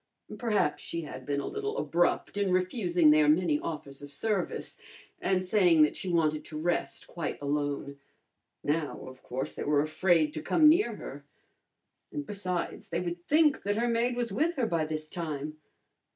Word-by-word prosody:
Perhaps 210 - +1
she 165 - -4
had 130 -4 -8
been 140 -1 0
a - - -4
little 425 +2 -3
abrupt 175 +3 +1
in 200 -2 +1
refusing 180 -3 +3
their 150 -1 +5
many 155 -1 +3
offers 150 -4 -6
of 145 - -9
service 195 +6 -2 0.5
and 185 -1 +1
saying 180 -5 +5
that 150 - +2
she 190 - -4
wanted 155 -3 +1
to 155 - -7
rest 175 +3 -1
quite 170 -3 -5
alone. 145 -1 -2 0.6
Now, 150 0 -1
of 130 0 -11
course, 130 +2 -4
they - - -5
were 145 0 +2
afraid 155 0 +2
to 155 - -4
come 305 - +4
near 345 +7 +4
her. - - -8 0.9
And, 295 -1 -4
besides, 185 -4 -4
they 170 - -2
would 175 -1 -4
think 300 -1 +4
that 205 +1 -1
her 235 +1 +1
maid 235 +1 +1
was 240 -3 -2
with 315 - +1
her 260 - +1
by 165 -7 0
this 155 0 -4
time. 155 -2 -5
170 Hz, 175 wpm, -29 LUFS, 150-205 Hz, 0.9 s, their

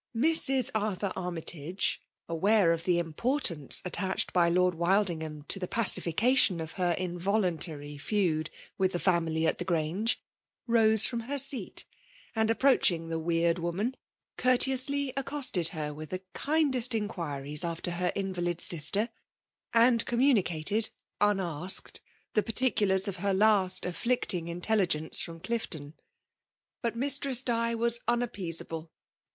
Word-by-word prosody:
Mrs. 270 -2 +3
Arthur 205 -3 -3
Armytage, 175 0 -2 0.3
aware 190 +2 +2
of 165 0 -5
the 180 -2 +1
im* 165 -2 -4
portance 185 - +2
attached 190 +1 -2
by 175 -2 +2
Lord 180 +1 +1
Wildingham 170 -4 -1
to 195 - +2
the 180 - -4
pacification 215 -1 +3
of 160 0 -6
her 180 -2 -1
involuntary 175 -5 -2
feud 160 -4 -1 0.3
with 190 0 0
the 175 - -2
family 165 -3 0
at - - 0
the - - -2
Grange, 175 +6 -1 0.5
rose 220 -2 +4
from 235 - -2
her 265 +5 -5
seat, 275 -1 +2 0.5
and 220 0 0
approaching 220 -10 +2
the 165 0 -3
weird 170 +1 0
woman, 190 +9 -3 0.4
courteously 265 +2 +2
accosted 275 - 0
her 150 -3 -5
with 155 +1 -10
the 185 0 -6
kindest 275 -6 0
inquiries 150 -9 0
after 170 +1 -4
her 180 +1 -2
invalid 175 -3 -3
sister; 175 +7 +4 0.6
and 235 0 +3
communicated, 220 - +2 0.3
unasked, 190 -4 -1 0.3
the 215 - +2
particulars 210 -5 +2
of 195 -2 -4
her 195 +1 -1
last 195 -2 +2
afflicting 180 -2 -1
inteUb* 180 +4 -1
gence 155 -1 +2
from 165 -1 -7
Clifton. 160 -9 -5 0.9
But 235 -1 -3
Mistress 275 0 +1
Di 230 -1 -1
was 235 +1 +3
unappeasable. 175 -9 0
190 Hz, 130 wpm, -28 LUFS, 170-230 Hz, 0.9 s, rose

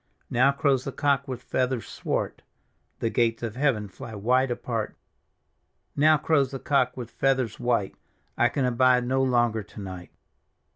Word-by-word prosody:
" - - -42
Now 130 +3 +4
crows 140 -2 +1
the 135 - -4
cock 140 0 +1
with 125 -2 -6
feathers 125 -3 -1
swart; - - -3 0.6
The 115 - 0
gates 115 -1 +1
of 115 -1 -4
heaven 130 -7 +1
fly 110 +3 -9
wide 125 +6 +2
apart 115 -2 -3 0.5
" - - -48
Now 155 +2 +5
crows 145 -3 +2
the 135 - -5
cock 130 -2 +1
with 120 -2 -6
feathers 130 -4 0
white; 120 -5 0 0.4
I 120 - +3
can 135 +1 -1
abide 125 0 +3
no 130 +2 +1
longer 120 -4 +2
to 105 +1 -12
night." 95 -3 -8
125 Hz, 165 wpm, -26 LUFS, 115-135 Hz, 0.6 s, Now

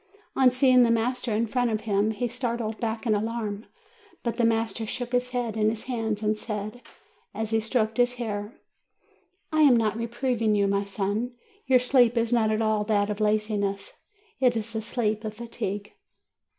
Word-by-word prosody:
On 260 -1 +6
seeing 255 0 +4
the 240 - +5
master 235 +1 0
in 220 +2 +1
front 245 +2 0
of 215 -1 -1
him, 210 -1 +1
he 220 +3 -1
started 235 -2 -3
back 225 +1 -3
in 220 - +3
alarm. 215 -1 -3 0.6
But 235 - -2
the 235 - +3
master 225 -1 0
took 245 +2 -4
his 250 0 0
head 245 -3 -2
in 215 -1 +2
his 220 0 -4
hands, 225 -4 -2
and 215 0 +2
said, 215 +2 -5 0.5
as 220 0 -3
he 225 - +3
stroked 220 -1 0
his 245 0 +2
hair: 210 -2 -5 0.9
"I 310 - +3
am 275 -5 +7
not 220 -2 +1
reproving 230 -1 0
you, 200 -1 +3
my 200 0 +1
son. 205 +5 -2 0.3
Your 260 -1 +6
sleep 245 -1 +3
is 230 +1 +1
not 225 -2 +3
at 215 +1 +1
all 215 -1 +1
that 205 -1 +1
of 205 - -4
laziness; 210 -2 -1 0.4
it 250 -3 +3
is 225 +1 -4
the 220 - -2
sleep 215 -1 -1
of 215 -1 -5
fatigue." 210 -3 -5
225 Hz, 185 wpm, -26 LUFS, 215-240 Hz, 0.9 s, am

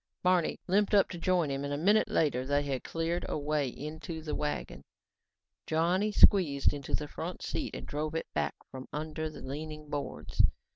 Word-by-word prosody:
Barney 180 -2 +3
limped 205 +3 +3
up 200 - +5
to 175 - -6
join 175 -4 +2
him 135 0 -2
and 140 - -3
a 145 - -1
minute 205 +8 +4
later 140 -5 +1
they 145 +2 +1
had 135 -3 -2
cleared 165 +1 -1
a - - -1
way 150 -1 0
into 155 +4 -6
the 155 -1 -4
wagon. 150 0 -3 0.9
Johnny 175 +6 +2
squeezed 165 -10 +5
into 140 -2 -2
the 150 - -4
front 170 +4 -6
seat 290 - -3
and - - -6
drove 155 +2 -3
it 165 - -1
back 75 -1 0 0.2
from 130 0 -8
under 155 +1 -3
more 155 - -10
leaning 150 +2 -6
boards. 145 -1 -1
155 Hz, 185 wpm, -31 LUFS, 145-175 Hz, 0.9 s, up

